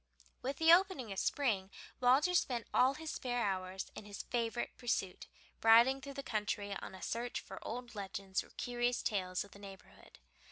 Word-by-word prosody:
With 270 Hz, +2 st, -3 dB
the 325 Hz, +1 st, +7 dB
opening 350 Hz, -, +3 dB
of 195 Hz, -, -2 dB
spring 215 Hz, -10 st, 0 dB, 0.3 s
Walter 265 Hz, +8 st, +4 dB
spent 245 Hz, -9 st, +1 dB
all 260 Hz, +2 st, +4 dB
his 315 Hz, 0 st, -5 dB
spare 245 Hz, -2 st, -1 dB
hours 190 Hz, -1 st, -3 dB
in -, -, -8 dB
his 205 Hz, -1 st, -7 dB
favorite 240 Hz, 0 st, -2 dB
pursuit, 195 Hz, -7 st, -2 dB, 0.3 s
riding 235 Hz, +4 st, +6 dB
through 280 Hz, 0 st, -8 dB
the 275 Hz, -, -5 dB
country 205 Hz, -3 st, -2 dB
on -, -, -8 dB
a 185 Hz, -, -10 dB
search 240 Hz, +1 st, -2 dB
for -, -, -9 dB
old 240 Hz, 0 st, -6 dB
legends 195 Hz, -1 st, -3 dB
or -, -, -18 dB
curious 245 Hz, 0 st, -1 dB
tales 185 Hz, -4 st, -1 dB
of 200 Hz, -, -16 dB
the 200 Hz, -, -13 dB
neighborhood. 195 Hz, -1 st, -13 dB
235 Hz, 175 wpm, -35 LUFS, 200-260 Hz, 0.3 s, the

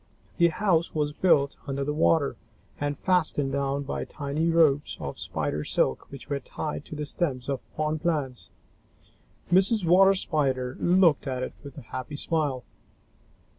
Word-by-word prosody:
The 170 Hz, -, +5 dB
house 170 Hz, -1 st, +1 dB
was 150 Hz, -1 st, 0 dB
built 145 Hz, -5 st, +2 dB
under 140 Hz, 0 st, -2 dB
the 150 Hz, +1 st, -2 dB
water 155 Hz, -1 st, +2 dB, 0.4 s
and 145 Hz, -1 st, -2 dB
fastened 160 Hz, -7 st, +1 dB
down 140 Hz, 0 st, -1 dB
by 140 Hz, -, -3 dB
tiny 150 Hz, +3 st, -2 dB
ropes 155 Hz, -4 st, +3 dB
of 70 Hz, -, -6 dB
Spider 75 Hz, +1 st, -2 dB
silk 65 Hz, -, 0 dB
which 135 Hz, -4 st, -9 dB
were 140 Hz, -1 st, -2 dB
tied 150 Hz, +3 st, -5 dB
to -, -, -8 dB
the 150 Hz, 0 st, -3 dB
stems 140 Hz, -5 st, -2 dB
of 140 Hz, -2 st, -1 dB, 0.2 s
pond 155 Hz, 0 st, -1 dB
plants. 135 Hz, -, -2 dB, 1.0 s
Mrs. 190 Hz, +2 st, +4 dB
Water 190 Hz, +3 st, +6 dB
Spider 130 Hz, -8 st, -1 dB
looked 175 Hz, -5 st, +3 dB
at 130 Hz, -1 st, -2 dB
it -, -, -5 dB
with 140 Hz, -1 st, -11 dB
a -, -, -7 dB
happy 130 Hz, +5 st, -6 dB
smile. 145 Hz, -5 st, -1 dB
145 Hz, 155 wpm, -26 LUFS, 135-165 Hz, 1.0 s, Water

